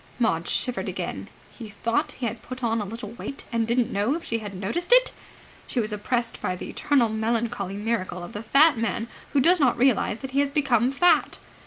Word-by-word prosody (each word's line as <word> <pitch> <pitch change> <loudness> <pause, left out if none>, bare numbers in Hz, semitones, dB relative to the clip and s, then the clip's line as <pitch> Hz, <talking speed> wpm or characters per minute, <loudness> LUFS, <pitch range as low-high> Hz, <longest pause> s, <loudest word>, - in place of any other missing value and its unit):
Maud 170 -9 0
shivered 250 -1 0
again. - - -5 0.2
He 225 -3 -10
thought 230 +3 -1
he 250 - -5
had 230 0 -4
put 255 0 -8
on 225 -1 +1
a - - -3
little 220 +1 -7
weight, 275 +4 -7
and 230 -1 0
didn't 235 0 +1
know 210 +8 +1
if 335 - -6
she 230 - -2
had 205 -3 -7
noticed 220 - -3
it! - - +6 0.6
She 250 - -2
was 215 -2 -1
oppressed 235 +3 -2
by 180 - -1
the - - -7
eternal 275 -5 +2
melancholy 220 -3 -2
miracle 205 -5 -2
of 175 - -9
the 210 - -5
fat 275 +3 +4
man 230 +1 -2 0.2
who 285 - +4
does 345 +6 +5
not 255 -5 +3
realize 240 -4 +2
that 265 -1 -6
he 275 - +1
has 285 0 +2
become 265 -4 +2
fat. 350 +6 +3
235 Hz, 210 wpm, -25 LUFS, 215-265 Hz, 0.6 s, it